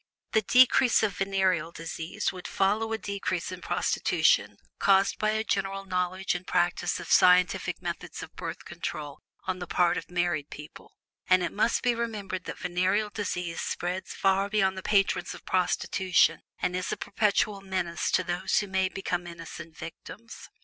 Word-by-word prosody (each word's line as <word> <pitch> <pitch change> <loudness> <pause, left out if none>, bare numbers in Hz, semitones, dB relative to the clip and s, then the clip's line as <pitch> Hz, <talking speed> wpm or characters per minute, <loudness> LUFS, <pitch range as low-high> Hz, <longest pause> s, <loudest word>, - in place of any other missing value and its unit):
The 220 - +3
decrease 250 +2 +5
of 205 -3 0
venereal 190 -3 +1
disease 165 +1 -4
would 180 -1 -7
follow 210 +3 +1
a 225 - 0
decrease 195 -4 -3
in - - -7
prostitution - - +1 0.2
caused 195 0 +3
by 215 - +2
a 220 0 0
general 195 -2 -2
knowledge 185 0 -1
and 180 0 -6
practice 175 0 +1
of - - -7
scientific 180 -1 +4
methods - - -5
of - - -12
Birth - - -6
Control 145 -2 -6 0.2
on 185 0 -2
the 180 - -6
part 175 -1 +2
of - - -6
married 175 -4 -1
people; 150 +1 -12 0.3
and 185 0 +4
it - - -2
must 225 +3 +1
be 245 -1 +3
remembered 210 -5 -4
that - - -6
venereal 185 +4 0
disease 180 -5 -3
spreads 180 +2 -3
far 195 +1 +2
beyond 195 -2 +2
the 190 - -5
patrons 195 0 +1
of - - -14
prostitution 185 0 +2 0.2
and 180 - -1
is 185 - -2
a - - -2
perpetual 205 -1 0
menace 185 -3 -2
to 185 - +2
others 180 +2 -1
who 205 - +2
may 190 0 +1
become 180 -2 -3
innocent 165 -1 -9
victims. 220 +7 -10
190 Hz, 165 wpm, -28 LUFS, 180-200 Hz, 0.3 s, decrease